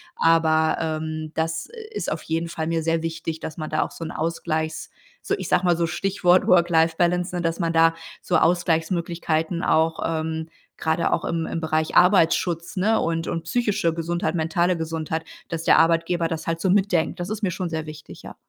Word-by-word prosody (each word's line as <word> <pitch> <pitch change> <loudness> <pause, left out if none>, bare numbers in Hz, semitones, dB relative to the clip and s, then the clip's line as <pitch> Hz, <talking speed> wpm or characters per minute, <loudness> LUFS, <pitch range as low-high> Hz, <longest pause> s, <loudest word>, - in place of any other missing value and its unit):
Aber, 160 -1 +3
ähm, 155 -1 -3
das 160 0 -2 0.3
ist - - -3
auf - - -4
jeden 165 +1 -2
Fall 160 -1 -3
mir 165 0 0
sehr 165 0 0
wichtig, 165 -1 -4
dass 160 - -7
man 155 -2 -5
da 155 - +1
auch - - -7
so - - -8
'n 160 - -5
Ausgleichs 160 -1 -3 0.3
so - - -1
ich - - -5
sage 180 - +2
mal 175 -1 +4
so 170 - +1
Stichwort 185 +1 +2
Work-Life-Balance, 175 +1 +3
ne, 175 - -1
dass 165 +1 -1
man 165 -2 0
da 165 0 +5 0.3
so 180 - +1
Ausgleichsmöglichkeiten 170 -1 0
auch, 160 +1 +2
ähm, 160 0 -2 0.3
grade 160 +1 0
auch - - -1
im 165 -1 -1
im - - -3
Bereich 160 -1 -1
Arbeitsschutz, 170 -2 +3
ne, 220 +4 +2
und 165 0 -1
und 165 - -3
psychische 200 -4 0
Gesundheit, 170 +1 -2
mentale 170 +2 +1
Gesundheit 160 0 -3 0.2
dass 165 -1 -3
der - - +6
Arbeitgeber 165 +1 +2
das 165 -1 -5
halt 165 0 -1
so 185 +1 +1
mitdenkt. 185 -5 +1
Das 175 +1 -4
ist 215 0 -4
mir 190 - +1
schon 185 -1 -3
sehr 160 -1 -3
wichtig, 155 0 -11
ja. - - -10
165 Hz, 190 wpm, -23 LUFS, 160-175 Hz, 0.3 s, der